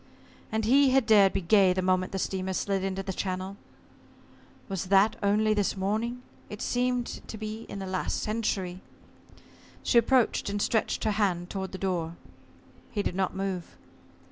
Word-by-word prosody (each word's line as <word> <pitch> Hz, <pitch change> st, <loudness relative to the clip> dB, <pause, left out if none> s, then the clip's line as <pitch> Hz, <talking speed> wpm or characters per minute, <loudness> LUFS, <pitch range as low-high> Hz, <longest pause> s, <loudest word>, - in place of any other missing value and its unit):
And 220 Hz, 0 st, 0 dB
he 270 Hz, +4 st, +5 dB
had 260 Hz, -1 st, +3 dB
dared 205 Hz, -3 st, +6 dB
be -, -, 0 dB
gay 190 Hz, +1 st, +5 dB
the 185 Hz, 0 st, -1 dB
moment 185 Hz, 0 st, +1 dB
the 195 Hz, -, -3 dB
steamer 190 Hz, 0 st, -2 dB
slid 195 Hz, 0 st, -1 dB
into 195 Hz, 0 st, -2 dB
the 190 Hz, -1 st, -4 dB
channel! 185 Hz, +1 st, -3 dB, 1.1 s
Was 195 Hz, -1 st, -3 dB
that 200 Hz, +3 st, +4 dB
only 210 Hz, +1 st, +3 dB
this 205 Hz, -1 st, 0 dB
morning? 220 Hz, +6 st, -2 dB, 0.3 s
It 210 Hz, -, -7 dB
seemed 250 Hz, 0 st, 0 dB, 0.2 s
to 220 Hz, -, -7 dB
be 215 Hz, +1 st, -6 dB
in -, -, -6 dB
the 195 Hz, -, -5 dB
last 185 Hz, 0 st, -2 dB
century. 195 Hz, -4 st, -2 dB, 1.0 s
She 235 Hz, -, +5 dB
approached, 235 Hz, -2 st, +2 dB
and 205 Hz, 0 st, -2 dB
stretched 220 Hz, +2 st, 0 dB
her 215 Hz, -, +2 dB
hand 185 Hz, -4 st, 0 dB
toward 190 Hz, -1 st, -4 dB
the 190 Hz, -, -6 dB
door. 175 Hz, -4 st, -2 dB, 0.7 s
He 205 Hz, -3 st, -2 dB
did -, -, -2 dB
not 190 Hz, 0 st, -1 dB
move. 190 Hz, -3 st, -4 dB
195 Hz, 170 wpm, -28 LUFS, 190-220 Hz, 1.1 s, dared